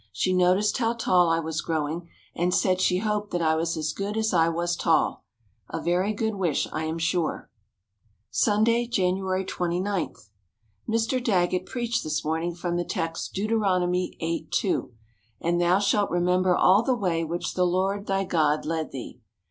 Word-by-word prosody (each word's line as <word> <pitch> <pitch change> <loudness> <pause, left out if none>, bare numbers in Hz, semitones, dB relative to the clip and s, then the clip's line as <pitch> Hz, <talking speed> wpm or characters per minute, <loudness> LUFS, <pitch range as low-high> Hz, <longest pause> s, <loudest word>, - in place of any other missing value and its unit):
She 185 - 0
noticed 185 +5 +3
how 230 -1 +1
tall 180 -7 +3
I 165 - +3
was 160 -1 -3
growing 160 +2 -3 0.2
and 175 +1 0
said 185 -1 +2
she 180 -1 +3
hoped 210 +1 -1
that 175 - -2
I 160 0 +3
was 165 +1 -1
as 155 -1 -2
good 205 +2 -3
as 220 -1 0
I 165 -1 +4
was 170 +1 -1
tall. - - +1 0.4
A - - -3
very 180 +4 +1
good 220 +1 -1
wish, 180 -7 0
I 160 - -2
am 160 +1 -3
sure. 165 - -1 0.8
Sunday, 230 +3 +2
January 190 -3 0
29. 180 +2 -2 0.7
Mr. 230 +3 0
Daggett 185 -4 +1
preached 235 -2 -2
this 155 -1 -2
morning 165 +2 -1
from 175 0 -2
the 175 - 0
text, 165 -1 -4
Deut. 215 +3 -2 0.7
8: 165 -1 -3
2: 190 -9 0 0.5
"And 175 +1 0
thou 175 +2 +4
shalt 200 0 +2
remember 180 +1 +2
all 195 +3 +5
the 255 +2 +1
way 175 -7 0
which 170 +2 -3
the 180 - +1
Lord 195 +3 -1
thy 195 0 +1
God 155 -5 +1
led 160 -1 -2
thee." 130 -3 -8
180 Hz, 170 wpm, -26 LUFS, 165-200 Hz, 0.8 s, all